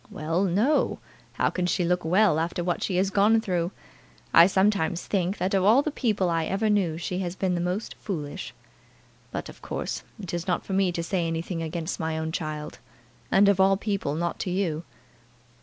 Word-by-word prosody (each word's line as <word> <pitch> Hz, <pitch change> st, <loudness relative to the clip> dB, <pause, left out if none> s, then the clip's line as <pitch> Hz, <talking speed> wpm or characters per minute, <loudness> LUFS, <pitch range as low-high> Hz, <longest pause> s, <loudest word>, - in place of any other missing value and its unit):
"Well; 165 Hz, +5 st, -1 dB
no: 210 Hz, -, +2 dB, 0.4 s
how -, -, +1 dB
can 180 Hz, -1 st, -1 dB
she 180 Hz, 0 st, +1 dB
look 180 Hz, +1 st, +1 dB
well 180 Hz, 0 st, +3 dB
after 170 Hz, +2 st, -2 dB
what 175 Hz, 0 st, -1 dB
she 190 Hz, -, -1 dB
has 190 Hz, +2 st, +1 dB
gone 210 Hz, +3 st, +4 dB
through? 180 Hz, -6 st, -1 dB, 0.6 s
I 170 Hz, +1 st, +9 dB
sometimes 190 Hz, -3 st, +1 dB
think, 190 Hz, 0 st, 0 dB
that 185 Hz, +2 st, -1 dB
of 190 Hz, -1 st, +3 dB
all 230 Hz, +8 st, +5 dB
the 305 Hz, -, -2 dB
people 215 Hz, -9 st, 0 dB
I 165 Hz, -1 st, 0 dB
ever 210 Hz, +2 st, 0 dB
knew, 180 Hz, -6 st, +1 dB
she 180 Hz, +2 st, -3 dB
has 180 Hz, -1 st, -3 dB
been 190 Hz, -1 st, 0 dB
the 175 Hz, -, -1 dB
most 180 Hz, +5 st, -2 dB
foolish. 170 Hz, -2 st, -5 dB, 0.8 s
But, -, -, -5 dB
of -, -, -12 dB
course, -, -, -4 dB, 0.2 s
it 185 Hz, -5 st, -7 dB
is 175 Hz, +1 st, -3 dB
not 180 Hz, -, 0 dB
for 195 Hz, -, -4 dB
me 190 Hz, -1 st, +2 dB
to 170 Hz, -1 st, -3 dB
say 170 Hz, 0 st, -1 dB
anything 165 Hz, +1 st, -3 dB
against 165 Hz, +3 st, -4 dB
my 160 Hz, -1 st, -2 dB
own 160 Hz, 0 st, -2 dB
child; 155 Hz, -2 st, -5 dB, 0.5 s
and, 200 Hz, +1 st, +5 dB
of 200 Hz, -1 st, +3 dB
all 195 Hz, 0 st, +5 dB
people, 200 Hz, -8 st, -2 dB
not 170 Hz, +2 st, -2 dB
to -, -, -2 dB
you." 175 Hz, -4 st, -1 dB
180 Hz, 200 wpm, -26 LUFS, 165-195 Hz, 0.8 s, I